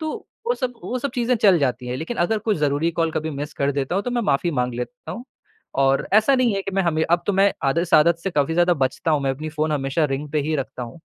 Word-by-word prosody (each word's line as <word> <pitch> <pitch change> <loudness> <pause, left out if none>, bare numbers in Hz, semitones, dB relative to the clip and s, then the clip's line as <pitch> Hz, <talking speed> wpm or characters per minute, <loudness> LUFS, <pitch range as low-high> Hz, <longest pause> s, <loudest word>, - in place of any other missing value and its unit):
तो 315 -1 -3 0.3
वो 480 - +2
सब 255 - -3
वो 255 - -2
सब 280 +3 -3
चीज़े 245 0 +1
चल 200 -5 +5
जाती 125 -3 -1
है, 125 +1 -3
लेकिन 165 - -5
अगर 195 +6 +1
कोई 215 0 0
ज़रूरी 150 +2 +1
कॉल 165 -1 +2
कभी 160 0 -2
मिस 145 0 -5
कर 140 0 0
देता 140 +4 -2
हूँ, 195 - +1
तो 245 - -3
मैं 240 -1 0
माफ़ी 175 -3 +1
माँग 125 -5 -1
लेता 240 - -6
हूँ। 240 - -7 0.6
और 135 0 +2
ऐसा 220 +6 +5
नहीं 250 -5 +2
है 195 - -2
कि 195 - -4
मैं 195 - +2
हमें 160 -3 +1
अब 175 0 +3
तो 205 - +2
मैं 195 +1 +4
आद 135 +4 +2
इस 170 0 +1
आदत 170 +2 +5
से 195 +3 -3
काफ़ी 150 -1 +1
ज़्यादा 175 +1 +4
बचता 135 +3 -1
हूँ, 150 -2 +2
मैं 135 - +1
अपनी 150 +4 -4
फ़ोन 155 0 -1
हमेशा 140 +2 0
रिंग 145 +1 -3
पे 155 - +1
ही 155 +2 -1
रखता 130 -2 -5
हूँ। 120 +8 -9
160 Hz, 280 wpm, -22 LUFS, 140-200 Hz, 0.6 s, चल